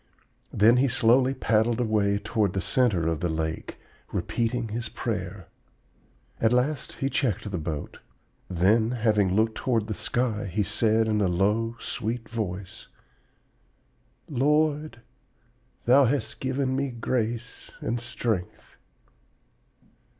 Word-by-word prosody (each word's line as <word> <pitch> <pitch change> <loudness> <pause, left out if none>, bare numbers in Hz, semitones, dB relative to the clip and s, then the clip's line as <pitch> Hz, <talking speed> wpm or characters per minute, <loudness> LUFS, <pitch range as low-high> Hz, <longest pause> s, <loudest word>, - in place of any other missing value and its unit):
Then 115 +4 +5
he 135 +2 +4
slowly 130 +2 +3
paddled 115 -1 +1
away 105 -4 +2
toward 105 -2 0
the 95 - -1
center 95 -3 +2
of 80 -2 0
the 85 - -1
lake, 80 0 -3 0.3
repeating 120 0 -1
his 115 +1 -4
prayer. - - -4 0.9
At 110 - +3
last 125 +3 0
he 135 - -2
checked 110 -7 -1
the 90 - -2
boat; 75 -2 -5 0.5
then, 100 +6 +3
having 105 -6 +2
looked 110 +1 +2
toward 115 -4 0
the 110 - -3
sky, 115 -1 -1
he 100 +3 0
said 110 +2 +2
in 105 -1 +1
a 100 - +3
low, 105 +6 +1
sweet 115 0 -4
voice, 95 -4 -5 1.4
'Lord, 150 -1 +1 0.8
Thou 130 +3 +6
hast 135 +3 -1
given 130 0 -1
me 140 0 0
grace 120 -1 -3
and 120 +2 -2
strength.' 115 -6 -4
115 Hz, 120 wpm, -26 LUFS, 100-125 Hz, 1.4 s, Thou